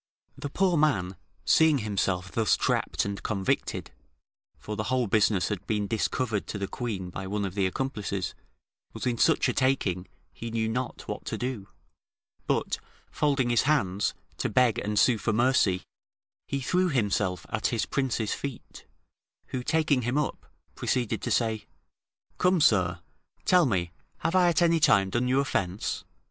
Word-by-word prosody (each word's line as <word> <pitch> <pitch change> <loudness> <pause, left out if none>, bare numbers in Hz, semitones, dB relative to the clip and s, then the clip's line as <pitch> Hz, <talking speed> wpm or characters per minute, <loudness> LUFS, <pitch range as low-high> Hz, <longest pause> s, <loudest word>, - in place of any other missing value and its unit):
The 145 - -5
poor 180 +2 +2
man 100 -12 +1 0.3
seeing 160 -2 +5
himself 95 -5 -1
thus 110 -3 +2
trapped - - 0
and 100 0 -4
convicted 95 -3 -1 0.7
(for 105 - -6
the 105 0 -3
whole 130 0 +1
business 100 -3 +2
had 100 -2 -4
been 105 -2 0
discovered 110 +1 -1
to - - -4
the 100 -1 -3
queen 100 -7 -4
by 95 +1 -5
one 100 +1 -1
of 95 - -4
the 95 -2 +1
accomplices), 100 - -3 0.6
was - - -5
in 120 -2 0
such - - +4
a - - 0
taking, 100 -9 +1 0.3
he 115 - -6
knew 110 -1 -1
not 125 +2 -3
what - - -5
to - - -3
do; 120 -6 -4 0.8
but, - - 0 0.3
folding 135 -5 +1
his 120 - +4
hands, 100 -10 +1 0.2
to - - -1
beg 125 -3 +3
and 105 0 -2
sue 115 +1 +4
for 110 - 0
mercy, 115 -6 +3 0.6
he 140 - -2
threw 180 +7 +1
himself 105 - 0
at 115 0 0
his 115 -3 0
prince's 125 -6 -1
feet, 140 -4 -7 0.6
who 130 - -3
taking 155 -1 +2
him 120 +4 -1
up, 150 - -2 0.3
proceeded 125 -4 -1
to - - -3
say, 110 -2 0 0.7
"Come, 180 0 +3
sir; 90 - +3 0.4
tell 180 -5 +5
me, 90 -6 0 0.3
have 165 - 0
I 180 -1 +5
at 170 0 +3
any 165 -1 +4
time 100 -10 +4
done 120 +3 +1
you 130 +2 +3
offence? 100 -8 -1
115 Hz, 160 wpm, -27 LUFS, 100-135 Hz, 0.8 s, seeing